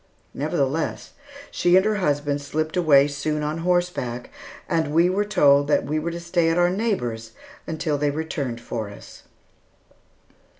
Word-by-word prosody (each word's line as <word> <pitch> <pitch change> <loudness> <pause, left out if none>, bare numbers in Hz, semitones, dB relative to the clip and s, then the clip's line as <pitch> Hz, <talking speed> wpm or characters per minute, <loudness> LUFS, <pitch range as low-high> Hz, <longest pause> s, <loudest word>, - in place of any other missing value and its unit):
Nevertheless, 145 +1 -2 0.4
she 175 0 +3
and 190 +1 +5
her 215 -1 +1
husband 145 -5 0
slipped 155 +3 -3
away 145 -6 +5
soon 150 +1 -2
on 150 +2 -2
horseback, 175 -9 -1 0.4
and 160 -3 0
we 170 +2 +4
were 200 +2 +1
told 145 -8 +4
that 150 - +2
we 155 +2 -1
were 165 +2 -3
to 170 0 -5
stay 170 -1 +1
at 165 - +1
our 175 0 +3
neighbor's 120 - -2 0.3
until 160 -2 -2
they 145 0 +1
returned 145 -5 -3
for 115 -3 -5
us. 100 - -13
155 Hz, 155 wpm, -23 LUFS, 140-175 Hz, 0.4 s, and